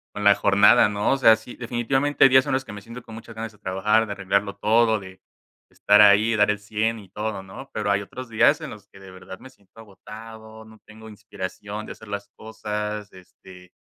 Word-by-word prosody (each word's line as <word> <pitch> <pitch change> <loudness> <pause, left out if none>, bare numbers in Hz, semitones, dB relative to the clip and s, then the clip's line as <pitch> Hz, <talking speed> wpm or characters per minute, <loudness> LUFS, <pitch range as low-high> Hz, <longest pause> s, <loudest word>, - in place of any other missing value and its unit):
con 105 - -5
la 100 0 +6
jornada, 100 +1 +4
¿no? 105 +3 -1
O 135 - +2
sea, 115 -4 +6
sí, 110 +2 -12
definitivamente, 130 +4 0
hay 135 - +8
días 130 0 +5
en - - -1
los 130 0 0
que 110 - -10
me 100 - -9
siento 115 +4 -11
con 110 - -13
muchas 115 +1 -11
ganas 110 0 -6
de 105 - -22
trabajar, 105 +4 +1
de 105 - -7
arreglarlo 100 +1 -1
todo, 110 +1 +2
de 95 -1 -13 0.5
estar 105 +1 +4
ahí, 105 +2 +5
dar 105 -1 +3
el 105 - -4
100 110 +2 -2
y 95 -3 -15
todo, 105 0 -5
¿no? 95 +8 -12
Pero 105 -1 -3
hay 100 0 +1
otros 125 +5 -9
días, 110 -1 +3
en - - -6
los 100 -2 -13
que 95 - -18
de 95 -1 -13
verdad 95 0 -11
me 130 - -13
siento 100 -3 -23
agotado, 110 +1 -12
no 110 0 -17
tengo 110 +1 -14
inspiración 105 0 -8
de - - -7
hacer 110 - -16
las 100 0 -6
cosas, 105 -1 -6
este, 90 0 -17
105 Hz, 225 wpm, -23 LUFS, 100-110 Hz, 0.5 s, hay